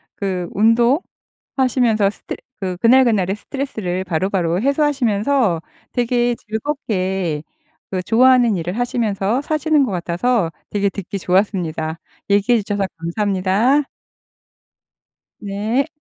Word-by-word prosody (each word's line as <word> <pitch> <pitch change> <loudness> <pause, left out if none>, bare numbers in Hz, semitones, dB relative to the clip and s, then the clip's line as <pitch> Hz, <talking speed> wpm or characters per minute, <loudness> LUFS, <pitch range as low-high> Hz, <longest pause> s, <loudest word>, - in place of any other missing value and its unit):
그 185 -3 -2
운동하시면서 235 - +1
스트 - - -8 0.2
그 185 -2 -3
그날그날의 230 -4 +4
스트레스를 210 -7 -4
바로바로 180 0 0
해소하시면서 265 - +1 0.3
되게 240 0 +1
즐겁게 190 - -2 0.5
그 185 -1 -1
좋아하는 240 0 +4
일을 175 +5 -4
하시면서 230 -2 0
사시는 305 -1 +2
거 220 - -4
같아서 180 +2 0 0.2
되게 200 -1 +1
듣기 200 0 -6
좋았습니다. 175 -4 0 0.3
얘기해 205 +3 +3
주셔서 200 -1 -1
감사합니다. 200 - +1 1.6
네. 215 +8 -1
210 Hz, 275 characters per minute, -19 LUFS, 185-245 Hz, 1.6 s, 그날그날의